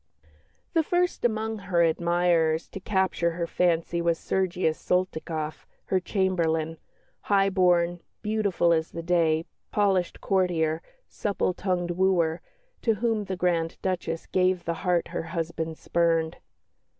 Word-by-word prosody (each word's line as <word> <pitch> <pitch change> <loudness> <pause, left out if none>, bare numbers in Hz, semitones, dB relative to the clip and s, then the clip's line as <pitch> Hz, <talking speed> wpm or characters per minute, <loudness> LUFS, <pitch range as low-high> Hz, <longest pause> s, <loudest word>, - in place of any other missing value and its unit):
The 330 - +4
first 355 +3 0
among 220 -1 0
her 180 -3 +2
admirers 170 -1 +2
to 195 - -7
capture 190 -3 +1
her 170 0 -2
fancy 170 0 +1
was 170 -1 +1
Sergius 180 -4 0
Soltykoff, 160 -4 -2 0.2
her 190 - +1
chamberlain, 165 -5 0 0.4
high 195 -1 +2
born, 175 -2 +3 0.2
"beautiful 205 -5 +2
as 160 0 0
the 170 - -6
day," 165 -2 +2 0.3
polished 195 -4 +1
courtier, 170 -4 +1 0.3
supple 200 -3 -1
tongued 180 -1 -1
wooer, 175 -2 +2 0.4
to 225 -2 +2
whom 225 -1 0
the 190 -1 -4
Grand 170 -2 0
Duchess 170 -3 -2
gave 185 -1 +1
the 170 - 0
heart 175 -2 +1
her - - -3 0.2
husband 165 -1 -3
spurned. 165 -1 +1
175 Hz, 125 wpm, -26 LUFS, 165-190 Hz, 0.4 s, The